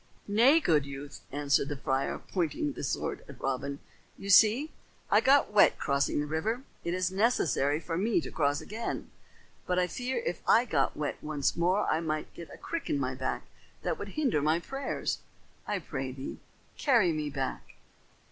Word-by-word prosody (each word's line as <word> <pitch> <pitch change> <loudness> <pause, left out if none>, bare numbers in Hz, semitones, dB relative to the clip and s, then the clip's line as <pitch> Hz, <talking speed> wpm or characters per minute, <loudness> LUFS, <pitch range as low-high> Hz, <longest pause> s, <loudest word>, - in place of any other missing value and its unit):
"Nay, 240 +10 +6
good 155 - +3
youth," 140 +1 -8
answered 140 -1 +1
the 145 - -3
friar, 135 0 -1
pointing 205 - -2
the - - -7
sword 135 - -2
at - - -11
Robin. 135 +1 -2 0.4
"You 200 - -3
see, 230 +10 +6 0.4
I - - +6
got 270 -5 +4
wet 210 - +6
crossing 140 0 +1
the 145 - 0
river. 210 - -2 0.2
It 170 +1 -1
is 185 0 0
necessary 165 - +2
for 165 0 -3
me 215 +1 +2
to - - -7
cross 145 -2 +1
again, 225 +3 -5 0.6
but 180 - +1
I 180 - +4
fear 245 +8 -3
if - - -2
I 235 - +6
got 145 - 0
wet 150 -1 -2
once 150 -2 0
more 180 +4 +2
I 155 - +2
might 155 -2 -3
get 170 - -9
a - - -10
crick 335 0 -5
in 145 - +1
my 130 -1 -1
back 130 0 -3 0.4
that - - -1
would - - -6
hinder 260 - +2
my 155 +3 +2
prayers. 270 +10 -3 0.5
I 205 - 0
pray 135 -6 -4
thee, 130 +1 -7 0.4
carry 235 - +4
me 155 -2 -2
back." 135 -2 -4
165 Hz, 180 wpm, -30 LUFS, 140-220 Hz, 0.6 s, Nay